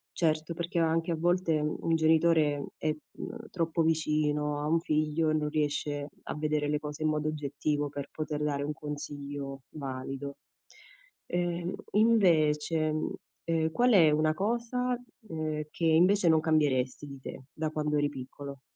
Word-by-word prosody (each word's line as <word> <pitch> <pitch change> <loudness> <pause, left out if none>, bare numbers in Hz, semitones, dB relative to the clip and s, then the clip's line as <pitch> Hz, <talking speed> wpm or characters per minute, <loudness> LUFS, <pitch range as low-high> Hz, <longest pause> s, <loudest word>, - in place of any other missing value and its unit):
Certo, 155 0 +1
perché 170 +1 -2
anche 165 +1 +1
a - - +1
volte 170 -1 +2
mhmm, 150 0 -1
un 165 - +2
genitore 160 +1 +4
è 145 -1 0
mhmm, 140 - -5 0.2
è, - - -3 0.3
mhmm, - - -5
troppo 165 -2 0
vicino 150 -2 +1
a 150 - -2
un 165 +2 +3
figlio 155 0 +1
e - - +2
non 150 -1 0
riesce 145 -1 -1
a - - -5
vedere 150 -1 0
le 150 0 +1
cose 150 +1 -5
in 155 - +3
modo 155 0 0
oggettivo 145 0 -1
per 140 -1 -6
poter 150 -1 -3
dare 140 -1 0
un 150 +1 -2
consiglio 145 -1 -6
valido. 135 0 -5 0.9
E 175 0 -1 0.2
invece, 160 -8 +3
mhmm, 155 0 -2 0.3
ehm, 160 -1 +1
qual 245 +7 +3
è 170 -6 +7
una 155 +1 +3
cosa, 240 +6 -1 0.3
ehm, 155 -1 -2
che 170 - -2
invece 175 +4 +5
non 160 -1 +6
cambieresti 145 -5 +1
di 140 -1 -9
te 130 - -8
da 155 0 -2
quando 150 -1 -1
eri 145 0 +2
piccolo? 140 0 -8
155 Hz, 165 wpm, -30 LUFS, 145-165 Hz, 0.9 s, è